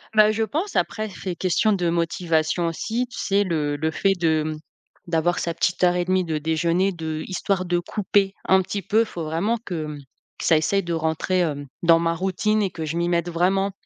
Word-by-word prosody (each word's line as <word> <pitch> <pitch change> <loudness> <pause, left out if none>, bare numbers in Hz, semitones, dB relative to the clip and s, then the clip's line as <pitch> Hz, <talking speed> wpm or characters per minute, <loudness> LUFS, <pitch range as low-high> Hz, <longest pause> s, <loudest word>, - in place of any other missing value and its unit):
Bah, 215 0 +6
je 220 - -2
pense 315 - -2
après 215 0 0
c'est 185 -1 -5
questions 195 +5 +2
de 180 -4 +1
motivation 165 0 0
aussi, 225 +9 -2
tu - - -7
sais? 200 0 +2
Le 150 -5 -1
le 160 +2 -1
fait 195 +4 +2
de, 160 -2 +2
mmh, 155 0 -3 0.5
d'avoir 170 +1 +1
sa 170 - -1
petite 180 +2 0
heure 180 0 +4
et 175 0 0
1/2 185 0 +1
de 160 -2 -2
déjeuner 165 +5 +1
de 160 -3 -4
histoire 185 0 -1
de 175 0 +1
couper 195 +2 0
un 190 0 +5
petit 200 +2 -4
peu, 220 +4 +2
faut 175 -6 -6
vraiment 170 +9 0
que, 170 -8 -4
mmh, 150 -1 -7 0.4
que - - -4
ça 160 - +5
essaye 195 +6 +1
de 170 -1 -4
rentrer, 160 +3 0
hem, 145 -4 -2 0.2
dans 165 -1 +6
ma 165 0 0
routine 190 +4 0
et 190 - -1
que 160 - -5
je 160 +2 -3
m'y 170 0 +1
mette 170 0 0
vraiment. 190 +3 +1
175 Hz, 215 wpm, -23 LUFS, 160-195 Hz, 0.5 s, Bah